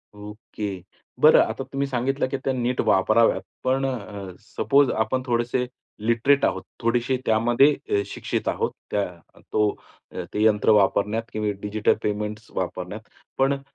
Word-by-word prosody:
Okay. 105 -2 -7 0.4
बरं - - +8
आता - - -4
तुम्ही 140 0 -3
सांगितलं, 135 +2 -1
की 135 - -2
त्या 135 - 0
नीट 125 0 0
वापराव्यात. 110 +4 +4 0.2
पण 130 +1 +1
अ, 100 -7 -5
सपोज 140 +6 +2
आपण 120 +4 0
थोडेसे 120 +1 0 0.4
लिटरेट 125 +5 +3
आहोत, - - -1 0.2
थोडेसे 120 +2 +1
त्यामध्ये 120 +6 +4 0.2
अ, 100 - +2
शिक्षित - - -4
आहोत. - - -1 0.2
त्या 105 - +1 0.5
तो 105 -1 +3 0.4
अ, - - -5
ते 105 - +1
यंत्र 105 -1 +3
वापरण्यात 105 +3 +1
किंवा 105 -1 -1
डिजिटल 105 +1 +1
पेमेंट्स 105 +1 -3
वापरण्यात. 90 +3 -4 0.4
पण 135 +1 +3
अ, 140 - -5
115 Hz, 145 wpm, -24 LUFS, 105-130 Hz, 0.5 s, बरं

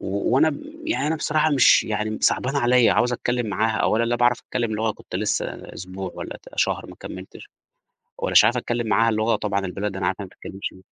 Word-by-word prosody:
و - - -7 0.3
وأنا 150 +1 +3 0.3
يعني 320 - -1
أنا 160 +1 0
بصراحة 155 0 +1
مش 140 -4 +5
يعني 110 0 -2
صعبانة 140 +3 +1
عليَّ، 125 -1 +4
عاوز 125 0 +2
أتكلم 120 -1 -1
معاها 110 +1 0
أولًا 115 +2 +2
لا 120 +1 0
باعرف 120 0 +2
أتكلم 115 -3 -3
لغة، 110 +1 0
كنت 90 - -8
لسه 105 +1 0 0.3
أسبوع 95 0 -7
والَّا - - -7
ت - - -16
شهر - - 0
ما - - -12
كملتش، - - -10 0.7
ومش - - +5
عارف 120 - +3
أتكلم 120 -1 -2
معاها 110 +2 +3
لغة 110 +1 +1
طبعًا 100 -2 -2
البلد 100 +1 -4
أنا 95 - -1
عارف 95 - 0
إنها 100 - -5
ما - - -16
بتتكلمش 95 +1 -6
بيها 95 - -17
115 Hz, 210 wpm, -23 LUFS, 105-125 Hz, 0.7 s, مش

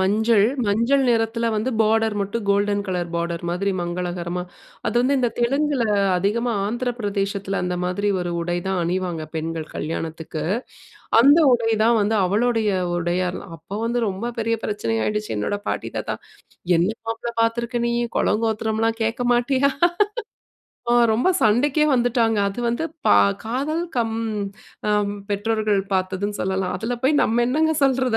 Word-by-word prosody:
மஞ்சள். 210 +2 +3 0.2
மஞ்சள் 235 +7 +2
நிறத்தில 230 0 +1
வந்து 215 +4 -1
பார்டர் 220 0 +2
மட்டும் 205 +3 -3
கோல்டன் 205 0 +1
கலர் 180 -2 -2
பார்டர் 170 0 -2
மாதிரி 190 +3 0
மங்களகரமா. 175 0 -3 0.4
அது - - -1
வந்து 270 +3 +2
இந்த 245 -2 +2
தெலுங்குல, 275 +2 +1 0.4
அதிகமா 230 +6 0
ஆந்திரப்பிரதேசத்தில, 205 -4 -2
அந்த 180 0 -1
மாதிரி 190 +3 -1
ஒரு 175 0 -3
உடை 175 +1 -1
தான் 190 -2 0
அணிவாங்க 175 -2 -2
பெண்கள், 160 0 -3
கல்யாணத்துக்கு. 160 0 -4 0.8
அந்த 285 +6 +7
உடைதான் 225 -1 +3
வந்து 210 +2 +1
அவளுடைய 220 +2 +1 0.3
உடையாலாம். 175 +1 -2
அப்ப 190 +5 -8
வந்து 235 +1 0
ரொம்ப 200 +5 -3
பெரிய 230 0 +1
பிரச்சனை 160 - -2
ஆயிடுச்சு. 210 - -2
என்னோட 105 - -1
பாட்டி, - - -2
தாத்தா, - - -2 0.6
"என்ன 170 +3 +2 0.2
மாப்பிளை 225 +1 -3
பார்த்துருக்க 235 +1 -1
நீ! 235 - 0 0.2
குலங்கோத்திரம்லாம் 225 +1 0
கேட்க 225 +2 -1
மாட்டியா?" 260 +3 +2 1.2
ஆ - - +5 0.2
ரொம்ப 240 +10 +2
சண்டைக்கே 265 +8 +3
வந்துட்டாங்க. 235 -3 +2
அது 220 +5 -6
வந்து 240 +7 -1 0.2
பா 100 - +7 0.3
காதல் 285 +9 -1
கம் 225 -2 0 0.7
அம் 205 -1 +1 0.2
பெற்றோர்கள் 210 -1 +1
பார்த்ததுன்னு 190 +2 -1
சொல்லலாம். 190 -1 -1
அதுல 240 +2 -2
போய் 290 +2 +4
நம்ம 235 +2 +2
என்னங்க 315 +4 +2
சொல்றது? 260 -3 +2
215 Hz, 135 wpm, -22 LUFS, 190-235 Hz, 1.2 s, அந்த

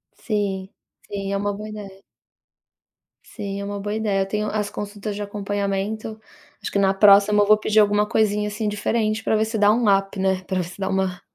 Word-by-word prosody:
Sim, 200 -3 -2 0.4
sim, 195 -1 -4
é - - +1
uma 205 +1 -1
boa 210 +2 -7
ideia. 195 -2 -9 1.2
Sim, 200 -3 -6
é - - -4
uma 205 0 -4
boa 205 +1 -3
ideia. 210 -3 0
Eu - - +1
tenho 210 +1 -2
as 210 -1 -2
consultas 205 0 -5
de 205 - -5
acompanhamento. 205 +1 -3 0.4
Acho - - -5
que 200 - +1
na 195 -1 +3
próxima 205 +1 +6
eu - - -2
vou 215 +1 +6
pedir 215 0 +2
alguma 205 0 +4
coisinha, 210 -1 +1
assim, 210 +1 -3
diferente 215 +1 -1
para 220 - +1
ver 215 0 +2
se 220 +1 -3
dá 205 0 +5
um 230 +1 +1
up 195 +1 -3
né, 190 -1 +1
para 185 0 -2
você 175 +2 -9
dar 190 -1 -2
uma 190 -1 -1
205 Hz, 205 wpm, -22 LUFS, 195-215 Hz, 1.2 s, próxima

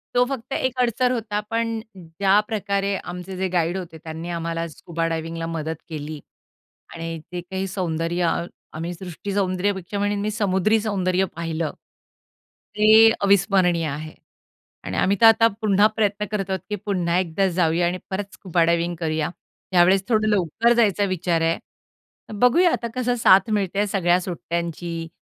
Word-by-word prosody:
तो 245 - +5
फक्त 265 -1 -5
एक 260 -1 -1
अडसर 245 +1 +2
होता. 220 -4 -2
पण 230 0 -1 0.2
ज्याप्रकारे 200 +3 0
आमचे 180 +2 -7
जे 190 +1 0
गाईड 175 +1 +1
होते 170 -3 -7
त्यांनी 160 +1 -6
आम्हाला 165 0 -3
स्कुबा 165 +1 -4
डायव्हिंगला 165 0 -3
मदत 160 -1 -3
केली 155 -1 -6 0.7
आणि 165 0 -5
ते 180 - -4
काही 190 +2 -4
सौंदर्य 175 -2 -2
अ, 170 - 0 0.3
आम्ही 165 +3 -4
सृष्टी 185 +2 -7
सौंदर्यपेक्षा 190 0 -1
मी 205 +1 0
समुद्री 210 0 +2
सौंदर्य 190 -3 0
पाहिलं, 165 -1 -3 1.1
ते 220 +1 +7
अविस्मरणीय 190 -4 +3
आहे. 155 +2 -6 0.7
आणि - - -4
आम्ही 200 +2 +2
तर - - +8
आता 225 0 +7
पुन्हा 205 -1 +4
प्रयत्न 210 -1 0
करत 195 -2 -2
आहोत 190 0 -1
की 210 - -1
पुन्हा 180 -4 0
एकदा 185 +2 0
जाऊया 170 0 +2
आणि 180 +1 -2
परत 195 +1 -4
स्कुबा 175 -3 0
डायव्हिंग 170 +1 +1
करूया. 155 -2 -1 0.4
यावेळेस 185 +2 +5
थोडं 215 -2 +2
लवकर 210 +4 +2
जायचा 210 -4 +2
विचार 175 -3 0
आहे. 165 0 +1 0.7
तर - - -7
बघूया 335 +9 +5
आता 235 - -2
कसं 250 -1 0
साथ 225 -2 +5
मिळते 195 -2 -1
आहे 205 - +2
सगळ्या 180 -3 +2
सुट्ट्यांची, 170 -1 -4
185 Hz, 150 wpm, -23 LUFS, 170-205 Hz, 1.1 s, तर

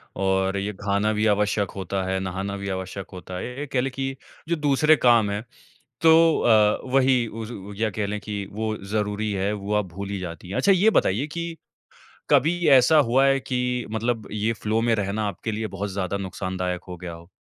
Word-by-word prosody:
और 95 0 +1
ये 100 +1 -2
खाना 100 +1 +1
भी 105 +1 0
आवश्यक 105 -1 +1
होता 95 0 -3
है, 95 - 0
नहाना 95 +2 -4
भी 100 0 -5
आवश्यक 95 0 -5
होता 90 0 -7
है। - - -4
ये 125 +2 -7
ये 145 - -3
कह 125 -1 0
लें 135 - -2
कि 135 0 -3 0.3
जो 170 - +2
दूसरे 150 +1 +4
काम 120 -6 +4
हैं, 105 +2 -3 0.6
तो 165 0 +6
अ, 105 -2 +4
वही 130 -2 +4
उस 110 +1 -7
उ 100 -2 -8
या 110 0 +1
कह 100 +1 -2
लें 105 +1 -3
कि 100 -1 -4
वो 110 +1 -2
ज़रूरी 105 +1 -1
है, 100 +1 -1
वो 105 0 -4
आप 105 -2 +1
भूल 100 +1 -6
ही 100 - -3
जाती 90 0 -7
हैं। 100 - -4
अच्छा 200 - +4
ये 195 +4 +5
बताइए 115 +11 -1
कि, 170 +1 -5 0.7
कभी 155 +5 +3
ऐसा 135 +3 +6
हुआ 130 +4 +3
है 135 0 +3
कि 125 -1 -2 0.3
मतलब 110 0 -2
ये 105 +2 0
फ़्लो 110 0 -1
में 115 -1 +2
रहना 105 +1 -2
आपके 110 +2 -4
लिए 110 +1 -3
बहुत 100 0 -4
ज़्यादा 100 0 -2
नुक़सान 95 -1 -5
दायक 90 -1 -2
हो 90 - -7
गया 85 0 -7
हो? 85 +2 -13
105 Hz, 215 wpm, -24 LUFS, 100-125 Hz, 0.7 s, तो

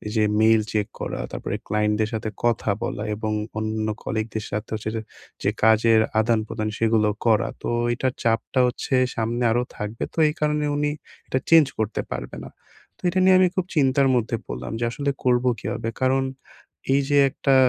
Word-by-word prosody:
যে 110 - +3 0.2
mail 110 0 +5
check 105 -2 0
করা - - -4
তারপরে - - -4
ক্লায়েন্টদের 105 0 +1
সাথে 110 0 -2 0.2
কথা 115 -3 +1
বলা, 105 - -3
এবং 110 0 -3 0.3
অন্যান্য 110 0 -1
কলিগদের 110 -1 -3
সাথে 105 +2 -3
হচ্ছে 110 0 -4
যে, 110 - -2 0.4
যে - - +3
কাজের 110 0 +5 0.2
আদানপ্রদান 110 -1 0
সেগুলোও 110 -2 +2
করা। 110 -2 +3
তো - - -2 0.2
এইটার 130 +1 -1
চাপটা 115 +3 +1
হচ্ছে 125 +2 -2 0.2
সামনে 115 +2 -1
আরো 120 +2 +2
থাকবে 105 +2 -4
তো - - -22
এই - - -3
কারণে 150 0 +1
উনি 145 0 +1 0.4
এটা 130 - 0
চেঞ্জ 165 -2 +8
করতে 110 0 -1
পারবে - - -6
না। - - -9 0.5
তো - - -27
এটা 185 - 0
নিয়ে 185 0 +7
আমি 185 - +6
খুব 185 - 0
চিন্তার 140 -2 +3
মধ্যে 115 -1 0
পড়লাম 65 +1 -5
যে 120 - 0
আসলে 140 +3 -1
করবো 125 0 +3
কীভাবে? 115 +2 -3
কারণ, 130 +1 +3 0.7
এই 140 - +4
যে 145 - +3
একটা 135 +1 +1
115 Hz, 175 wpm, -23 LUFS, 110-130 Hz, 0.7 s, চেঞ্জ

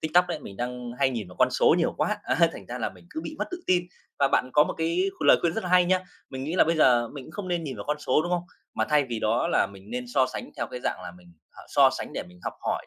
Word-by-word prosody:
TikTok 175 +3 +3
đấy, 170 -3 -2
mình 100 -7 -10
đang 125 0 -4
hay 135 -1 +3
nhìn 110 -7 -4
vào 90 - -14
con 130 - +4
số 125 - +4
nhiều 170 - +1
quá, 210 - 0
a, - - 0 0.2
thành - - -10
ra 125 +1 -5
là 115 - -1
mình - - -18
cứ 315 - -4
bị 310 - -7
mất - - 0
tự 360 -1 -5
tin. 180 -1 +2 0.3
Và 140 - +4
bạn 130 -1 +1
có 150 - +6
một - - -4
cái 170 +4 +1
lời - - +6
khuyên 170 - +1
rất 225 - -3
là 180 - -3
hay 180 -1 +6
nhá, 185 +1 +2 0.3
mình 130 0 -5
nghĩ 160 - -3
là 185 - +5
bây 165 +1 +1
giờ 120 -6 +4
mình 140 -3 -9
cũng - - -12
không 185 0 -6
nên 175 -2 -1
nhìn 135 -4 -5
vào - - -6
con 150 +1 -1
số, 150 +1 +2
đúng 175 - -4
không? 175 -1 +1 0.3
Mà - - +1
thay 150 -1 +4
vì 120 -3 -4
đó 110 +2 +1
là - - +3
mình 100 +1 -14
nên 125 +1 -3
so 130 -2 +4
sánh 130 - -7
theo 120 - -2
cái 125 +2 -7
dạng - - -2
là 90 - -6
mình, 90 -1 -18 0.2
à, - - -14
so - - +5
sánh - - -6
để - - -3
mình 90 0 -17
học - - -3
hỏi - - -2
140 Hz, 315 wpm, -26 LUFS, 120-175 Hz, 0.3 s, có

